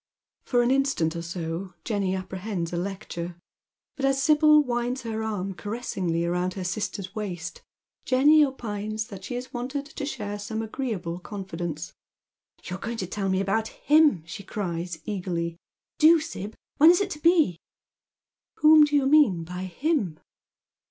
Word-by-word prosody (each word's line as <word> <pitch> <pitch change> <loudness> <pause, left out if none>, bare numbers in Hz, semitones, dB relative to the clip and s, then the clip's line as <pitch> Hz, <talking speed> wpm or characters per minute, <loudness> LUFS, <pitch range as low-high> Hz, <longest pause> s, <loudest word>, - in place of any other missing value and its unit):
For 245 -2 +2
an 240 - +2
instant 270 - +1
or 170 - -3
so 170 +2 -5
Jenny 200 -4 0
apprehends 185 -2 -4
a - - -1
lecture, 180 -2 -5 0.6
but 275 - -6
as 270 0 +3
Sibyl 305 0 +6
winds 245 0 -2
her 220 -1 -3
arm 200 -3 -3
caressingly 190 -5 -2
round 180 +1 -1
her 190 - -4
sister's 190 0 -3
waist, 180 -6 -5 0.4
Jenny 295 +4 +5
opine« 215 -6 -3
that 195 -2 -9
she 245 - -5
is 250 +1 -6
wanted 260 +4 -3
to 290 -1 -6
share 205 -7 -4
some 220 +2 -3
agreeable 215 -8 -4
confidence. 175 -4 -5 0.4
" - - -38
You 185 - -5
are - - -19
going 230 +2 -4
to 190 - -2
tell 195 +2 -2
me 190 0 +1
about 215 +3 0
him," 295 - +3
she 165 +4 -7
cries 175 -4 -4
eagerly. 175 -5 -3 0.4
"Do, 320 +2 +7
Sib. 225 - -6 0.2
When 315 +3 +8
is 350 - +6
it 400 -1 -1
to 300 - -5
be? 315 - +3 0.3
" - - -68
" - - -67
Whom 305 0 +8
do 295 0 -1
you 280 -2 +3
mean 270 - +5
by 180 +2 -5
him? 190 - -1
205 Hz, 165 wpm, -26 LUFS, 180-270 Hz, 0.6 s, When